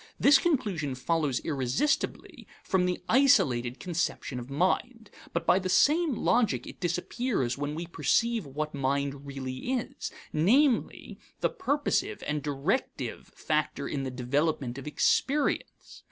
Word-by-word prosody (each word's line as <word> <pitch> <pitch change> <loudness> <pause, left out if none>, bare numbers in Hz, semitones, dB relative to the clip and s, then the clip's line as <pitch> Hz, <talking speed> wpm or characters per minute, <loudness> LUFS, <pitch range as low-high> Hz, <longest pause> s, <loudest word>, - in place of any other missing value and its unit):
This 280 -1 +7
conclusion 195 - 0
follows 145 -1 0
irresistibly 215 - -1 0.2
from 185 -1 +1
the 180 - -2
isolated 135 - +3
conception 170 -6 -2
of 120 +2 -9
mind, 210 - -1 0.2
but 170 0 -2
by 185 - +4
the 185 -1 -3
same 305 - +3
logic 230 -1 +1
it - - -10
disappears 180 - -1
when 145 +1 -3
we 170 +2 -4
perceive 230 +6 +1
what 150 +3 -4
mind 140 0 -2
really 135 - -4
is 250 -3 -4 0.2
namely, 235 - +2 0.2
the - - +2
purposive 370 +5 -1
and 150 0 -1
directive 145 - -2
factor 150 -2 -1
in 140 - -3
the 135 - -3
development 135 +1 -1
of 135 - -9
experience. 270 - 0
165 Hz, 130 wpm, -28 LUFS, -, 0.2 s, This